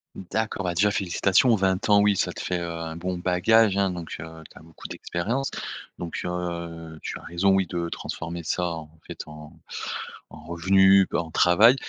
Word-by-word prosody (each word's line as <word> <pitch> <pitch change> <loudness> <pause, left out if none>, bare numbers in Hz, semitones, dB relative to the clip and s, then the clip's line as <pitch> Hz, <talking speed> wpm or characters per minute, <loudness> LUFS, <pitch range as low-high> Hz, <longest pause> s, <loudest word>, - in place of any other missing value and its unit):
D'accord, 105 +2 -3
bah, 90 -1 -1
déjà 100 +4 +3
félicitations, 100 +4 +3
20 95 +1 0
ans, 100 0 +7
oui, 105 -1 +4
ça - - 0
te - - -9
fait, 90 -1 -1
heu, 85 -1 -4
un 80 -1 -5
bon 90 +1 -3
bagage, 100 +4 +4
hein, 100 -1 +2
donc 85 -2 -6
heu, 75 - -6 0.2
tu - - -17
as - - -14
beaucoup 80 0 -11
d'expérience. 115 +11 -2 0.5
Donc 85 -1 -4
heu, 85 -2 -4
tu - - -4
as - - -14
raison, 85 +4 +1
oui, 95 -1 +2
de 85 -1 -2
transformer 85 +1 -5
ça, 90 - -1
en 80 -3 -4 0.2
fait, - - -9
en 75 0 -11 0.8
en - - -13
revenus, 95 +3 +5
en 80 -1 -1
travail, 105 +8 +6
90 Hz, 185 wpm, -25 LUFS, 85-100 Hz, 0.8 s, ans